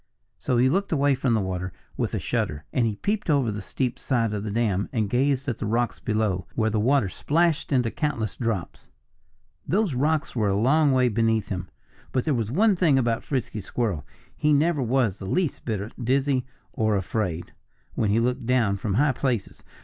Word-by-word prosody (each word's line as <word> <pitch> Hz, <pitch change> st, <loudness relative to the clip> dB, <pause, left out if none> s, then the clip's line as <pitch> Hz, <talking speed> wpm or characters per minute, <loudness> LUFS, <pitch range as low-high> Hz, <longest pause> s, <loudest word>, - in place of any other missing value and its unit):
So 125 Hz, -, 0 dB
he 125 Hz, +2 st, +4 dB
looked 195 Hz, +8 st, 0 dB
away 145 Hz, -2 st, +3 dB
from 125 Hz, -2 st, +1 dB
the -, -, +2 dB
water 90 Hz, -2 st, -3 dB, 0.2 s
with -, -, -2 dB
a -, -, -1 dB
shudder. 75 Hz, 0 st, -2 dB
And 120 Hz, -3 st, +2 dB
he 105 Hz, -, -2 dB
peeped 205 Hz, -, -2 dB
over 140 Hz, -7 st, +3 dB
the 105 Hz, 0 st, -5 dB
steep 125 Hz, +5 st, -3 dB
side 115 Hz, -5 st, 0 dB
of 105 Hz, -1 st, -3 dB
the 110 Hz, -, -3 dB
dam 105 Hz, -3 st, 0 dB
and 110 Hz, -5 st, 0 dB
gazed 135 Hz, +2 st, +1 dB
at 120 Hz, -4 st, -2 dB
the 110 Hz, -, -2 dB
rocks 115 Hz, +1 st, 0 dB
below, 105 Hz, -5 st, -1 dB
where 110 Hz, -1 st, +1 dB
the 110 Hz, -, +1 dB
water 125 Hz, 0 st, +3 dB
splashed 160 Hz, -, 0 dB
into 125 Hz, -4 st, +2 dB
countless 120 Hz, -, -2 dB
drops. 115 Hz, -7 st, -3 dB, 0.8 s
Those 200 Hz, -3 st, +1 dB
rocks 150 Hz, +4 st, 0 dB
were 110 Hz, -4 st, +1 dB
a 100 Hz, -, +1 dB
long 145 Hz, +5 st, +4 dB
way 130 Hz, -1 st, +4 dB
beneath 110 Hz, -2 st, +1 dB
him. 90 Hz, -2 st, -4 dB, 0.4 s
But 130 Hz, -, 0 dB
there 155 Hz, -, +2 dB
was 115 Hz, -4 st, -1 dB
one 200 Hz, -, +3 dB
thing 165 Hz, -6 st, +3 dB
about 115 Hz, -3 st, +1 dB
Frisky 125 Hz, -6 st, -3 dB
Squirrel 100 Hz, -, -2 dB, 0.3 s
he 150 Hz, 0 st, +2 dB
never 150 Hz, +1 st, +2 dB
was 120 Hz, -5 st, +1 dB
the 95 Hz, -, -6 dB
least 175 Hz, -, -1 dB
bit 110 Hz, -1 st, -3 dB
dizzy, 130 Hz, +1 st, +1 dB, 0.3 s
or 110 Hz, -1 st, +1 dB
afraid, 95 Hz, -3 st, -3 dB, 0.4 s
when 110 Hz, -, 0 dB
he 105 Hz, +3 st, +3 dB
looked 125 Hz, +1 st, -1 dB
down 115 Hz, -6 st, +2 dB
from 95 Hz, 0 st, -2 dB
high 145 Hz, +4 st, +4 dB
places. 125 Hz, -5 st, -2 dB
120 Hz, 195 wpm, -25 LUFS, 105-140 Hz, 0.8 s, he